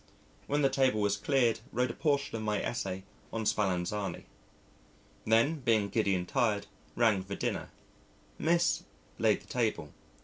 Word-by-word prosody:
When 145 +1 +1
the 135 - +5
table 130 -5 +2
was 100 -1 +2
cleared 120 +1 +2
wrote 125 +1 0
a - - -8
portion 140 -4 0
of 110 - -3
my 105 -1 0
essay 95 -5 -3 0.3
on 115 -1 -3
Spallanzani.... 100 0 -1 1.0
Then, 115 +8 +3
being 110 -6 +2
giddy 100 -3 +1
and 90 -1 -2
tired, 110 -6 +1 0.3
rang 110 -5 +3
for 100 +1 -6
dinner. - - -2 0.7
Miss 170 +1 +2 0.4
laid - - +3
the - - -18
table. 110 -11 -1
110 Hz, 145 wpm, -31 LUFS, 100-130 Hz, 1.0 s, the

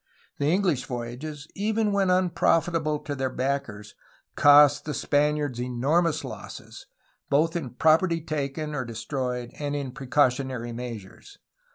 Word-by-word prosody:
The 145 - +1
English 175 -9 +1
voyages, 130 +5 -6
even 215 +1 0
when 200 -2 +2
unprofitable 170 -3 +2
to 145 - -5
their 135 -1 -2
backers, 125 -6 -3 0.4
cost 145 0 +6
the 150 - -3
Spaniards 145 -3 0
enormous 145 +7 +1
losses, - - -9 0.4
both 160 +4 +2
in 155 -7 -3
property 165 +4 +3
taken 150 -1 -4
or 130 -3 -2
destroyed 125 +1 -4
and 145 -1 -2
in 140 -3 -3
precautionary 130 -3 0
measures. 120 - -8
145 Hz, 125 wpm, -26 LUFS, 125-160 Hz, 0.4 s, cost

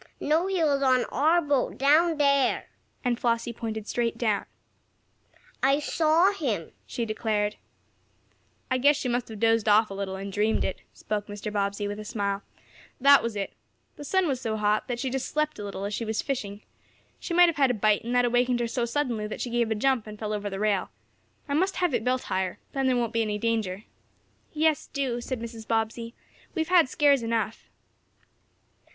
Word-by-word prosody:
"No, 320 +5 +1
he 380 -3 0
was 285 -3 +2
on 255 -2 +3
our 325 +5 +3
boat 285 -3 0
down 310 +4 +4
there," 280 -3 +2 0.4
and 245 -1 +1
Flossie 235 0 0
pointed 220 -2 -5
straight 235 -1 -1
down. 215 -4 0 1.1
"I 275 +1 +4
saw 320 +5 +3
him!" 235 - -3 0.2
she 235 - -3
declared. 215 -1 -1 1.1
"I 255 - +2
guess 285 +3 +5
she 270 - -3
must 245 0 -1
have 220 -2 -9
dozed 225 -1 +3
off 215 0 +4
a - - -4
little, 195 -1 -4
and 195 0 -6
dreamed 215 +2 +1
it," - - -4
spoke 210 -1 -4
Mr. 205 +1 -6
Bobbsey, 200 0 -1
with 205 +1 -5
a - - -6
smile. 200 -2 -2 0.6
"That 280 +2 +7
was 230 -2 -3
it. 200 -1 -3 0.4
The 290 - -9
sun 380 +4 +1
was 265 -3 -1
so 220 -3 -2
hot, 210 0 +1
that 245 -1 -3
she 260 0 -2
just 265 0 -2
slept 305 -3 -1
a - - -5
little 200 -1 -5
as 205 - -3
she 230 - -2
was 220 -1 -2
fishing. 210 -7 -4 0.6
She 340 - -4
might 355 0 +8
have 335 - -1
had 275 -2 +4
a - - +2
bite, 215 0 +2
and 240 +2 -2
that 245 0 +4
awakened 245 0 +2
her 240 - 0
so 235 0 -1
suddenly 235 -4 -1
that 215 - -6
she 245 - -3
gave 235 -1 +1
a 220 - 0
jump 245 0 +1
and 210 0 -8
fell 215 0 -3
over 205 -1 -3
the 195 - -5
rail. 205 -2 0 0.6
I 280 - -2
must 375 +6 +1
have 355 -5 0
it - - 0
built 255 +1 0
higher. 185 -1 -2
Then 270 -1 0
there 255 -1 +2
won't 235 -1 -1
be 230 - +2
any 210 -2 -1
danger." 215 -3 -1 0.7
"Yes, 310 -1 +1
do," 255 -4 -2
said 255 0 -4
Mrs. 225 -1 -8
Bobbsey. 230 +1 -2 0.4
"We've 320 -1 -1
had 345 -7 +5
scares 285 -2 +3
enough." 230 -1 -2
235 Hz, 200 wpm, -27 LUFS, 215-275 Hz, 1.1 s, might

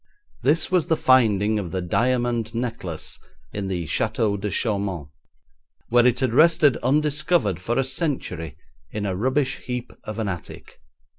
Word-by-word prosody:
This 150 +7 +2
was 175 -3 +2
the 160 -2 +2
finding 110 -5 +3
of 95 -4 -4
the 95 - -2
diamond 120 +3 0
necklace 115 -9 -4 0.3
in 100 -1 -3
the 90 -3 -2
Château 105 +6 0
de 105 - -1
Chaumont, 100 - -2 0.8
where 120 +1 +5
it 125 +1 +1
had 130 -3 +1
rested 155 -1 +5
undiscovered 145 - +1
for 115 +6 -2
a 135 - +3
century 130 - -3 0.3
in 105 -1 -4
a 95 -2 -1
rubbish 130 +6 0
heap 125 -1 -5
of 110 - -6
an 110 -2 -1
attic. 90 -4 -7
115 Hz, 150 wpm, -23 LUFS, 100-130 Hz, 0.8 s, where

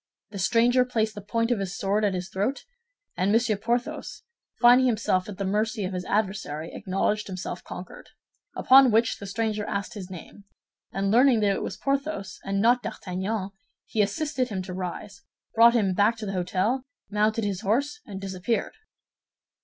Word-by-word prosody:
The 200 - -6
stranger 240 +6 +4
placed 225 -3 -1
the 205 - -8
point 230 +4 -1
of 235 - +1
his 195 -1 -4
sword 200 +2 0
at 200 -2 +1
his 180 0 -4
throat; 205 +9 -2 0.5
and 190 +2 +1
Monsieur 225 0 +3
Porthos, 235 +4 -3 0.4
finding 250 +1 +6
himself 210 -5 0
at 200 - -7
the 195 - -2
mercy 210 +2 0
of 185 - -4
his 180 0 -4
adversary, 190 -7 -2
acknowledged 210 +2 -1
himself 185 -2 -6
conquered. - - -9 0.5
Upon 265 0 +7
which 225 +1 +2
the 200 - -7
stranger 215 +1 -1
asked 200 -1 -3
his 195 -4 -8
name, 190 +3 -11 0.5
and 195 0 -1
learning 245 0 +5
that 200 -1 +3
it - - -3
was - - -4
Porthos, 275 -8 -2
and 195 0 -1
not 240 +4 +4
D'Artagnan, 190 0 -4 0.3
he 220 - 0
assisted 255 +5 -1
him 190 -3 -3
to 185 0 -7
rise, 190 +2 -6 0.3
brought 235 +1 +6
him 200 -5 +2
back 205 +5 +3
to 220 - -6
the 195 - -3
hôtel, 190 +7 0 0.3
mounted 215 +2 +1
his 200 -2 -2
horse, 275 - 0
and 195 -3 -8
disappeared." 195 +3 -2
210 Hz, 175 wpm, -26 LUFS, 195-230 Hz, 0.5 s, Upon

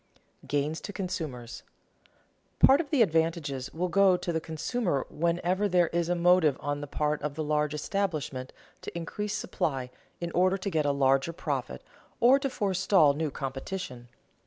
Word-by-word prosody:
[Sidenote: - - -17
Gains 145 +3 -1
to 205 - -7
consumers] 155 - -5 0.9
Part 275 +4 +6
of 305 - -9
the 275 -6 +5
advantages 160 - -1
will 180 +3 -2
go 190 0 +4
to 175 - -3
the 160 - -1
consumer 160 - -2
whenever 175 +5 0
there 175 -2 +3
is 170 0 -1
a 175 - +2
motive 175 -5 +4
on 145 0 -3
the 145 - -6
part 150 +1 -1
of 145 -1 -3
the 155 - -2
large 150 0 0
establishment 150 -7 -2 0.3
to - - -7
increase 205 +5 -4
supply 135 -10 -2 0.3
in 170 0 -4
order 185 +3 +3
to 195 +1 -4
get 155 -3 +1
a - - +3
larger 135 +3 +2
profit 135 - -4 0.4
or 255 +4 +6
to 275 -1 -1
forestall 190 - +3
new 155 +1 -2
competition. 135 -1 -6
165 Hz, 165 wpm, -28 LUFS, 145-185 Hz, 0.9 s, Part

